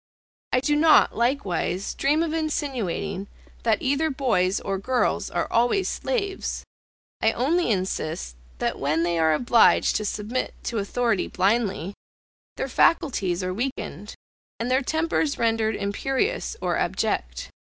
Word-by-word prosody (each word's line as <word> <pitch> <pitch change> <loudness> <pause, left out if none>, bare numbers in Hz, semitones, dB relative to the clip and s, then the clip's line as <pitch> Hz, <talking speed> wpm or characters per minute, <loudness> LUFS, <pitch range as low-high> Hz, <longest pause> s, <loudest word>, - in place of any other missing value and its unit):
I 255 - +2
do 295 +2 +1
not, 310 +1 +5
likewise, 200 - -1
dream 300 +4 +2
of 320 -2 -2
insinuating 270 - -2 0.3
that 225 -2 +1
either 285 +4 +1
boys 215 -10 +1
or 195 -1 -3
girls 250 +5 0
are - - -1
always 245 +12 +2
slaves, 400 -6 -2 0.6
I 220 0 +3
only 310 +6 +1
insist, 180 - -2 0.2
that - - -2
when 155 +4 +1
they 170 -1 0
are 160 -1 +4
obliged 240 +4 +4
to 215 - -3
submit 215 +5 -3
to 230 - -2
authority 220 0 0
blindly, 195 -2 0 0.6
their - - -2
faculties 195 - +2
are 185 0 -2
weakened, 210 - -4 0.4
and 235 +2 -2
their 260 +1 +3
tempers 315 0 0
rendered 225 -1 +1
imperious 270 - -1
or - - 0
abject. - - -2
235 Hz, 130 wpm, -24 LUFS, 195-280 Hz, 0.6 s, not